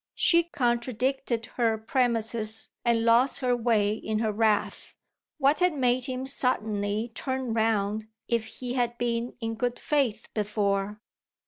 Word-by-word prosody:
She 340 Hz, -1 st, +4 dB
contradicted 245 Hz, -3 st, -1 dB
her 230 Hz, -2 st, +2 dB
premises 225 Hz, -2 st, 0 dB
and 230 Hz, -1 st, +2 dB
lost 235 Hz, +3 st, +4 dB
her 250 Hz, -1 st, +2 dB
way 225 Hz, -3 st, +2 dB
in 220 Hz, 0 st, -3 dB
her 220 Hz, 0 st, 0 dB
wrath. 215 Hz, 0 st, 0 dB, 0.4 s
What 285 Hz, 0 st, +3 dB
had 360 Hz, -3 st, +2 dB
made 250 Hz, -1 st, +2 dB
him 260 Hz, 0 st, -3 dB
suddenly 220 Hz, -4 st, 0 dB
turn 260 Hz, -1 st, -3 dB
round 220 Hz, -1 st, 0 dB, 0.2 s
if 235 Hz, -2 st, 0 dB
he 245 Hz, +1 st, -5 dB
had 240 Hz, -2 st, -1 dB
been 235 Hz, 0 st, -2 dB
in 225 Hz, 0 st, -2 dB
good 245 Hz, +2 st, -2 dB
faith 275 Hz, -8 st, 0 dB
before? 205 Hz, -1 st, -1 dB
235 Hz, 135 wpm, -27 LUFS, 220-255 Hz, 0.4 s, She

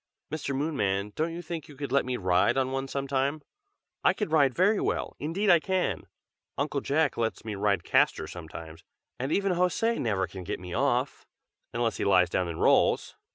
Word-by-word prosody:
"Mr. 150 Hz, -3 st, -3 dB
Moonman, 105 Hz, -9 st, -1 dB
don't 160 Hz, +2 st, -1 dB
you 170 Hz, +1 st, -6 dB
think 160 Hz, -2 st, -6 dB
you 145 Hz, -, -13 dB
could 140 Hz, -2 st, -5 dB
let 140 Hz, -1 st, +2 dB
me 125 Hz, -1 st, -1 dB
ride 95 Hz, +5 st, +2 dB
on 130 Hz, -1 st, +1 dB
one 135 Hz, 0 st, -2 dB
some 140 Hz, 0 st, -3 dB
time? 140 Hz, +3 st, 0 dB, 0.6 s
I -, -, +5 dB
can 210 Hz, -, -3 dB
ride 145 Hz, -5 st, +3 dB
very 200 Hz, +4 st, +3 dB
well, -, -, -2 dB
indeed 185 Hz, +7 st, +1 dB
I 170 Hz, -, +7 dB
can! 180 Hz, -, -1 dB, 0.5 s
Uncle 140 Hz, 0 st, -1 dB
Jack 145 Hz, +1 st, +1 dB
lets 115 Hz, -1 st, -2 dB
me 110 Hz, -, -3 dB
ride 100 Hz, -3 st, +1 dB
Castor 80 Hz, -, +2 dB
sometimes, 80 Hz, -1 st, -9 dB, 0.4 s
and 130 Hz, +4 st, -2 dB
even 195 Hz, +1 st, +2 dB
José 180 Hz, +6 st, +1 dB
never 100 Hz, -5 st, 0 dB
can 95 Hz, -2 st, -9 dB
get 100 Hz, +4 st, -4 dB
me 90 Hz, -1 st, -8 dB
off, -, -, 0 dB, 0.4 s
unless 115 Hz, -1 st, -1 dB
he -, -, -2 dB
lies 90 Hz, -3 st, +4 dB
down 90 Hz, -, 0 dB
and 85 Hz, -1 st, -5 dB
rolls! -, -, +3 dB
135 Hz, 195 wpm, -28 LUFS, 100-160 Hz, 0.6 s, I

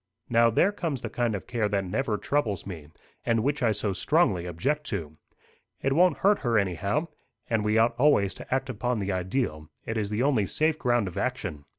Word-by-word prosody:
"Now, 115 Hz, 0 st, +5 dB
there 180 Hz, -, +3 dB
comes 160 Hz, -10 st, -3 dB
the 115 Hz, -, -4 dB
kind 120 Hz, -3 st, 0 dB
of 100 Hz, -, -6 dB
care 115 Hz, -4 st, -1 dB
that 100 Hz, -1 st, 0 dB
never 105 Hz, +3 st, -1 dB
troubles 115 Hz, -6 st, -1 dB
me, 85 Hz, -7 st, -8 dB, 0.4 s
and 115 Hz, -1 st, +1 dB
which 145 Hz, +2 st, 0 dB
I 115 Hz, -3 st, +3 dB
so 105 Hz, -1 st, -1 dB
strongly 100 Hz, -, +2 dB
object 145 Hz, -, -2 dB
to. 80 Hz, -7 st, -4 dB, 0.6 s
It 135 Hz, -, 0 dB
won't 175 Hz, +1 st, +4 dB
hurt 205 Hz, 0 st, +5 dB
her 120 Hz, -3 st, +1 dB
anyhow. 100 Hz, -, 0 dB, 0.4 s
And 110 Hz, -2 st, +2 dB
we 105 Hz, +1 st, +2 dB
ought 115 Hz, +1 st, +4 dB
always 125 Hz, -9 st, +4 dB
to -, -, -11 dB
act 135 Hz, +1 st, 0 dB
upon 125 Hz, 0 st, -2 dB
the 100 Hz, -1 st, -2 dB
ideal; 95 Hz, -, -2 dB, 0.2 s
it 110 Hz, -, -3 dB
is 105 Hz, -2 st, -2 dB
the 105 Hz, +4 st, 0 dB
only 125 Hz, -8 st, +2 dB
safe 155 Hz, -, +1 dB
ground 120 Hz, -4 st, +1 dB
of 90 Hz, -, -5 dB
action. 75 Hz, -2 st, -3 dB
115 Hz, 205 wpm, -27 LUFS, 100-135 Hz, 0.6 s, Now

